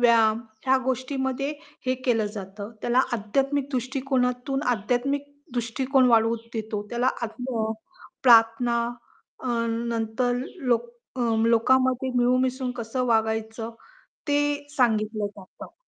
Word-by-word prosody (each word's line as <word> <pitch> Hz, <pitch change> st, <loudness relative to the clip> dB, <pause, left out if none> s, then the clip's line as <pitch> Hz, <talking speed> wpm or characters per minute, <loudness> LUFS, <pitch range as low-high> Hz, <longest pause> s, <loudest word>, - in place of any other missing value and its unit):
व्यायाम 225 Hz, -2 st, +5 dB, 0.3 s
ह्या 265 Hz, +1 st, +5 dB
गोष्टीमध्ये 265 Hz, +1 st, -1 dB, 0.4 s
हे 255 Hz, -, +2 dB
केलं 225 Hz, -4 st, +2 dB
जातं. 200 Hz, +1 st, -7 dB
त्याला 240 Hz, +2 st, +3 dB
आध्यात्मिक 270 Hz, +6 st, 0 dB
दृष्टिकोनातून 260 Hz, +1 st, -1 dB
आध्यात्मिक 250 Hz, +6 st, -1 dB, 0.3 s
दृष्टिकोन 255 Hz, +3 st, +2 dB
वाढवून 230 Hz, 0 st, +4 dB, 0.2 s
देतो 220 Hz, -2 st, -3 dB
त्याला 240 Hz, +2 st, +1 dB
आत्म 235 Hz, 0 st, -2 dB
अ, 220 Hz, -, -1 dB, 0.5 s
प्रार्थना 235 Hz, 0 st, +5 dB, 0.7 s
अ, -, -, -5 dB, 0.2 s
नंतर 230 Hz, +1 st, -1 dB
लोक 245 Hz, -7 st, -1 dB, 0.3 s
अ, -, -, -3 dB, 0.3 s
लोकामध्ये 255 Hz, +3 st, +3 dB
मिळून-मिसळून 255 Hz, +1 st, +2 dB
कसं 240 Hz, +2 st, -2 dB
वागायचं 225 Hz, 0 st, 0 dB, 0.6 s
ते 290 Hz, 0 st, +3 dB, 0.4 s
सांगितलं 215 Hz, -4 st, +2 dB
जातं. 200 Hz, -2 st, -12 dB
240 Hz, 105 wpm, -25 LUFS, 225-260 Hz, 0.7 s, व्यायाम